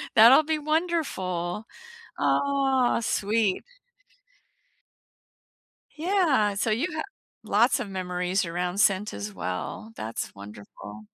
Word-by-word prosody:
that'll 240 +7 +8
be 315 0 -1
wonderful, 250 - -2 0.5
aw, 270 -4 +2
sweet. 210 -2 0 2.3
Yeah, 315 - +2
so 220 - 0
you 250 +11 +1
have 315 - -3 0.4
lots 225 +4 +3
of 200 - -4
memories 180 0 -1
around 180 +2 -3
scent 200 +1 +2
as 100 0 -6
well. 90 - -5
That's 110 +1 -5
wonderful. 105 +1 -11
210 Hz, 95 wpm, -26 LUFS, 180-270 Hz, 2.3 s, that'll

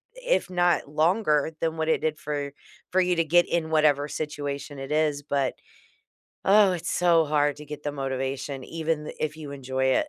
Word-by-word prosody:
if - - 0
not 175 -4 +1
longer 155 0 +2
than 165 0 -1
what 160 0 -1
it - - +2
did 155 -1 -1
for 145 -2 -4 0.4
for 185 - +3
you 180 -1 +2
to 165 - +3
get 175 +2 +4
in 165 -2 -1
whatever 150 -2 +3
situation 145 -1 -5
it 135 +1 -6
is, 150 -2 +1
but, 140 -2 -1 0.9
oh, 200 -1 +6
it's 175 -1 -3
so 170 -2 +3
hard 145 -1 +2
to 150 - -11
get 150 0 -8
the 145 - -3
motivation 135 0 -3
even 160 0 -2
th - - -7
if 155 0 -2
you 155 -2 -8
enjoy 130 -1 -2 0.2
it. 305 - -4
150 Hz, 190 wpm, -26 LUFS, 145-165 Hz, 0.9 s, oh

